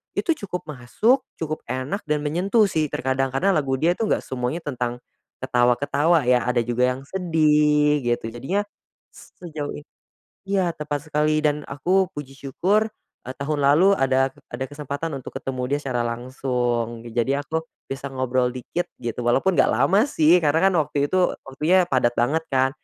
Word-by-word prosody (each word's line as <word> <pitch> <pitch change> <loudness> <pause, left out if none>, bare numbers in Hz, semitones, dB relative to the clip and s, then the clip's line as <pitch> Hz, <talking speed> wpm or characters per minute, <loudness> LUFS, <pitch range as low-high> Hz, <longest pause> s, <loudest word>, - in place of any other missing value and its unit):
itu 340 - +1
cukup 180 -2 -4
masuk, 180 - +1 0.2
cukup 155 -1 -3
enak 130 - -3
dan 150 0 +1
menyentuh 185 +9 +2
sih 155 -4 0
terkadang 135 +1 0
karena 190 +9 +2
lagu 135 -3 +1
dia 170 +2 +3
itu 225 - -2
nggak - - 0
semuanya 130 +5 -3
tentang 125 -3 -3 0.4
ketawa-ketawa 145 +6 +2
ya, 125 - +3
ada 120 -1 +2
juga 120 +1 0
yang 135 - -10
sedih 150 -5 +2
gitu. 115 -1 -1
Jadinya 165 - -2 0.5
s - - -16
sejauh 155 -4 -5
i 145 - -9 0.6
iya, 190 -3 +1
tepat 150 0 -5
sekali 150 +1 +2
dan 150 0 +1
aku 180 +7 +1
puji 135 -2 -7
syukur, 190 +11 +1 0.4
eee, 130 - -5
tahun 145 +1 -2
lalu 150 +8 +5
ada 135 0 +2 0.2
ada 130 +2 -3
kesempatan 145 +1 -4
untuk 130 - -10
ketemu 130 -1 -4
dia 145 - +1
secara 125 -3 -1
langsung. 120 -1 -2
Jadi 120 +4 0
aku 160 +3 -2 0.3
bisa 135 +1 -5
ngobrol 130 -1 0
dikit 150 +8 -3 0.2
gitu 115 0 -4
walaupun 155 +10 +3
nggak - - +6
lama 140 - +3
sih 165 - +4
karena 155 -1 +2
kan - - -3
waktu 145 -1 0
itu 185 - +2 0.2
waktunya 155 +8 +2
padat 120 -2 +2
banget 155 +7 0
kan 130 0 +3
145 Hz, 165 wpm, -23 LUFS, 130-160 Hz, 0.6 s, nggak